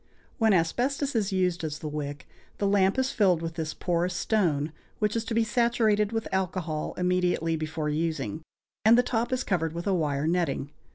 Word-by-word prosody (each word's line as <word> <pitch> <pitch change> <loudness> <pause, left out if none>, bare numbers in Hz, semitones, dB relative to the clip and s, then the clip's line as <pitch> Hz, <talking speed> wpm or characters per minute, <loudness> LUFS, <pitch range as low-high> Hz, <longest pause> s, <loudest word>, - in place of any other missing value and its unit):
When 225 -1 +4
asbestos 250 - +1
is 210 -3 +1
used 180 -3 0
as 150 -1 -3
the 155 - -6
wick, 145 -2 -5 0.3
the 205 - -1
lamp 195 +1 +3
is 260 0 +1
filled 185 -6 +2
with 165 0 -3
this 160 -2 -4
porous 175 0 0
stone, 165 -8 +1 0.3
which 210 0 0
is 230 - 0
to 225 - -3
be 230 - +4
saturated 220 -2 +2
with 225 -1 -2
alcohol 180 -5 -2
immediately 180 -2 +1
before 155 0 -3
using, 155 -5 -2 0.4
and 225 +2 +7
the 245 - +5
top 240 -1 -1
is 255 0 0
covered 165 -5 0
with 170 +1 -5
a 200 - +2
wire 150 -4 0
netting. 160 -5 0
180 Hz, 185 wpm, -27 LUFS, 160-215 Hz, 0.4 s, and